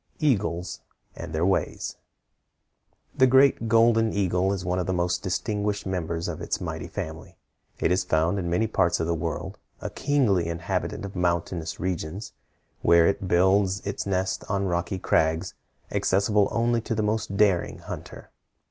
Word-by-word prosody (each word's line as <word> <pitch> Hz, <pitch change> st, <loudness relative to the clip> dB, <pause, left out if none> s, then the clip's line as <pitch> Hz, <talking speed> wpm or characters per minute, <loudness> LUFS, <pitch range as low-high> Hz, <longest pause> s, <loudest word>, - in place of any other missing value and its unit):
EAGLES 95 Hz, -, 0 dB, 0.4 s
AND -, -, -7 dB
THEIR 80 Hz, +2 st, 0 dB
WAYS. 95 Hz, -, -1 dB, 1.2 s
The 130 Hz, -, +5 dB
great 130 Hz, -2 st, +4 dB
golden 115 Hz, 0 st, +4 dB
eagle 95 Hz, -1 st, +1 dB
is 95 Hz, -2 st, -3 dB
one 90 Hz, +1 st, 0 dB
of 90 Hz, -, -2 dB
the 95 Hz, -, 0 dB
most 90 Hz, 0 st, 0 dB
distinguished 105 Hz, +3 st, -2 dB
members 85 Hz, -3 st, -2 dB
of -, -, -5 dB
its -, -, -2 dB
mighty -, -, -5 dB
family. 80 Hz, +1 st, -7 dB, 0.4 s
It -, -, +1 dB
is 90 Hz, 0 st, +2 dB
found 85 Hz, +3 st, +1 dB
in 85 Hz, -2 st, -2 dB
many 90 Hz, +6 st, +2 dB
parts 95 Hz, -5 st, +1 dB
of 80 Hz, -, 0 dB
the 85 Hz, -, 0 dB
world, 85 Hz, 0 st, -4 dB, 0.2 s
a -, -, -5 dB
kingly 120 Hz, -, +1 dB
inhabitant 85 Hz, +3 st, -3 dB
of 100 Hz, -, -8 dB
mountainous 85 Hz, -2 st, -1 dB
regions, 90 Hz, +2 st, -4 dB, 0.5 s
where 85 Hz, -1 st, +5 dB
it 100 Hz, 0 st, 0 dB
builds 95 Hz, +2 st, +3 dB
its 100 Hz, 0 st, -3 dB
nest 95 Hz, -1 st, -1 dB
on 100 Hz, 0 st, 0 dB
rocky 90 Hz, +1 st, -1 dB
crags 80 Hz, -2 st, +1 dB, 0.4 s
accessible 100 Hz, +2 st, +2 dB
only 120 Hz, 0 st, +1 dB
to 115 Hz, -, -3 dB
the 110 Hz, -, 0 dB
most 105 Hz, -1 st, -1 dB
daring 100 Hz, -5 st, +2 dB
hunter. -, -, -9 dB
95 Hz, 155 wpm, -26 LUFS, 85-105 Hz, 1.2 s, The